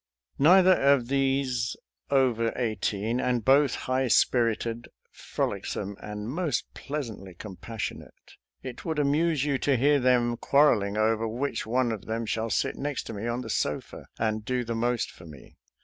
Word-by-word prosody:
Neither 185 +5 +7
of 135 -3 +3
these 135 -3 0 0.3
over 125 -5 +2
eighteen, 110 -1 -1
and 125 -3 0
both 135 0 +4
high 130 +1 -1
spirited, 115 -1 +1 0.2
frolicsome, 100 +1 -4
and 105 0 -6
most 145 -2 -2
pleasantly 115 -11 -6
compassionate, 105 +3 -8 0.3
it 130 -2 -7
would 160 -2 -3
amuse 150 0 +1
you 140 -3 0
to 140 -1 +2
hear 145 +3 +3
them 120 -2 +2
quarreling 105 -9 +3
over 110 +1 +1
which 120 0 -3
one 125 +1 +1
of 110 -3 -5
them 115 +1 -3
shall 110 +1 -2
sit - - -1
next 145 -1 -3
to - - -7
me 105 +2 -4
on 120 +1 -2
the 115 - -8
sofa 75 - -3
and 110 -1 -1
do 125 +2 -1
the 115 0 -4
most 120 +1 -1
for 85 - -14
me. 75 -4 -14
120 Hz, 155 wpm, -27 LUFS, 110-135 Hz, 0.3 s, Neither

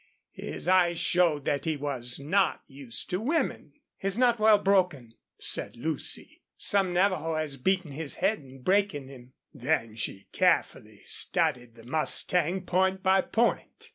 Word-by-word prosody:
His - - -7
eyes 180 -2 +4
showed 165 -6 +2
that 140 -1 -1
he 160 -2 -1
was 130 -4 -4
not 185 +8 +1
used 135 +1 -6
to 180 - 0
women. 265 - -1 0.2
"He's 195 +1 -2
not 240 -2 +3
well 215 0 +6
broken," 180 - +1 0.2
said - - -3
Lucy. 155 +5 -4 0.2
"Some 195 -2 +1
Navajo 175 -3 +1
has 155 -3 -3
beaten 185 +3 0
his 150 +1 -3
head 215 +1 +1
in 135 -2 -15
breaking 185 -8 +1
him." 125 -2 -14 0.2
Then 125 -5 -1
she 100 -3 -5
carefully - - 0
studied 125 -2 0
the 115 -1 -15
mustang 170 +5 +1
point 190 +1 0
by 190 0 +4
point. 235 +5 -1
160 Hz, 145 wpm, -28 LUFS, 135-190 Hz, 0.2 s, well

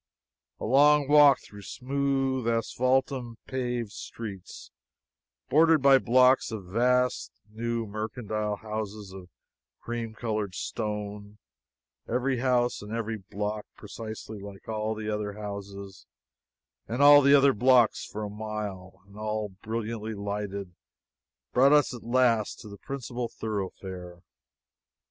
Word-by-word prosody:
A - - -4
long 145 +3 +5
walk 145 -1 +7
through 105 -1 -13
smooth, 135 +1 -1
asphaltum 125 +1 0
paved 125 -4 -3
streets 100 -6 -8 0.8
bordered 160 0 +4
by 135 -1 +7
blocks 130 +2 +4
of 105 -4 -6
vast 125 +6 +1 0.2
new 115 +1 -2
mercantile 105 0 -3
houses 105 -2 -6
of 95 -2 -11 0.5
cream 115 -2 -5
colored 105 -5 -3
stone 105 -1 -5 0.7
every 125 +2 0
house 125 -1 +1
and 105 +1 -9
every 115 -1 -2
block 105 +1 -5
precisely 110 0 -8
like 100 -1 -11
all 110 0 -2
the 110 0 -6
other 105 -1 -2
houses 100 -2 -8 0.8
and 120 +5 0
all 145 0 +9
the 140 +1 +6
other 140 -1 +5
blocks 125 0 +4
for 110 - -6
a - - -3
mile, 105 -4 -6
and 100 +1 -16
all 110 0 -2
brilliantly 110 0 -4
lighted 100 -2 -4 0.8
brought 135 +3 +5
us 145 -3 +4
at 120 - -8
last 120 -3 +1
to - - -11
the 100 -1 -11
principal 125 -2 -5
thoroughfare. 95 -5 -6
110 Hz, 120 wpm, -28 LUFS, 105-125 Hz, 0.8 s, all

